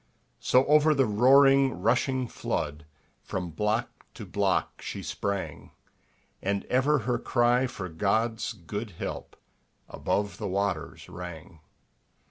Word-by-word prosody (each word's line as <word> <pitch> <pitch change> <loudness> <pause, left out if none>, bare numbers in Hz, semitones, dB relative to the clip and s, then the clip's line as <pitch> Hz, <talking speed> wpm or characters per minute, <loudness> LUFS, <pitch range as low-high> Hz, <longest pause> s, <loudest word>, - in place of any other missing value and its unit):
So 130 +1 +3
over 150 +1 +5
the 135 -1 +3
roaring 135 +3 +5
rushing 125 +5 +1
flood, 75 -7 -4 0.3
From 90 -3 -4
block 105 +7 -2
to - - -8
block - - -1
she - - -6
sprang, 100 -1 -4 0.7
And 100 0 -1
ever 135 +4 +2
her 125 -1 0
cry 120 +1 +2
for 95 -6 -6
God's 110 +7 0
good 105 +1 -6
help - - -6 0.5
Above 100 0 -2
the - - -3
waters 95 -4 -2
rang. 85 -1 -9
105 Hz, 115 wpm, -27 LUFS, 95-130 Hz, 0.7 s, over